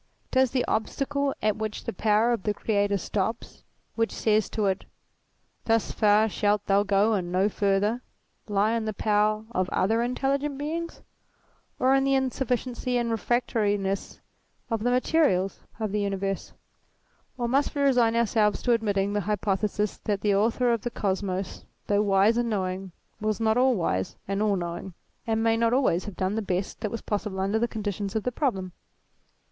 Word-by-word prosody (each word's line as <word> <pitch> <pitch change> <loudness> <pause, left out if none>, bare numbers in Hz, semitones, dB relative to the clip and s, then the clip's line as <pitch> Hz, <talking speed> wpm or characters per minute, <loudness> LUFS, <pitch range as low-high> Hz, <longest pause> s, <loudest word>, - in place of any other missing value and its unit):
Does 260 0 +4
the 250 0 0
obstacle 275 +5 -1
at 215 -1 +2
which 215 -1 -4
the - - -4
power 215 +4 +2
of 230 - -2
the 210 +1 -1
Creator 205 -2 +1
stops, 210 +4 -3 0.3
which 225 0 0
says 215 -1 +1
to 215 - -1
it: 190 0 0 0.8
Thus 225 -1 +1
far 210 +1 +4
shalt 205 -1 0
thou 195 0 +3
go 205 +2 +2
and 180 -4 -1
no 185 +2 +3
further, 205 +4 +1 0.5
lie 205 +1 +2
in 230 -1 -1
the 215 -1 -3
power 215 +1 +1
of 185 -4 0
other 225 +5 +1
Intelligent 275 +3 -1
Beings; 330 +4 -4 0.7
or 260 +1 +3
in 270 0 +3
the 275 0 +2
insufficiency 250 -1 -1
and 235 -1 0
refractoriness 205 -4 -1 0.5
of 225 -2 0
the 245 - +1
materials 250 - +2 0.2
of 215 -3 -2
the 210 0 0
universe; 195 -1 -2 0.8
or 240 -1 -1
must 275 +5 +1
we 285 - +1
resign 245 -4 +3
ourselves 220 -2 +2
to 245 - +3
ad 230 - +1
mitting 200 -2 0
the 205 - 0
hypothesis 210 0 0
that 205 -2 0
the 205 -1 +2
author 235 +4 +2
of 230 - -1
the 240 - -2
Kosmos, 190 -3 -3 0.2
though 205 0 +2
wise 205 +2 +3
and 240 -1 +1
knowing, 190 -2 -2 0.3
was 215 -2 -1
not 220 -1 +2
all 255 0 +4
wise 95 - -1
and 195 +1 -1
all 210 -2 +2
knowing, 175 0 -5 0.3
and 225 0 +1
may 225 0 +3
not 230 +1 +2
always 250 -9 +2
have 205 - -8
done 190 +1 0
the 220 - -1
best 185 -1 -3
that 215 - -1
was 230 +1 -5
possible 205 -2 -3
under 200 +3 +1
the 235 - +1
conditions 205 -2 -4
of 220 - 0
the 250 - -1
problem 195 - -1
215 Hz, 175 wpm, -26 LUFS, 200-235 Hz, 0.8 s, Does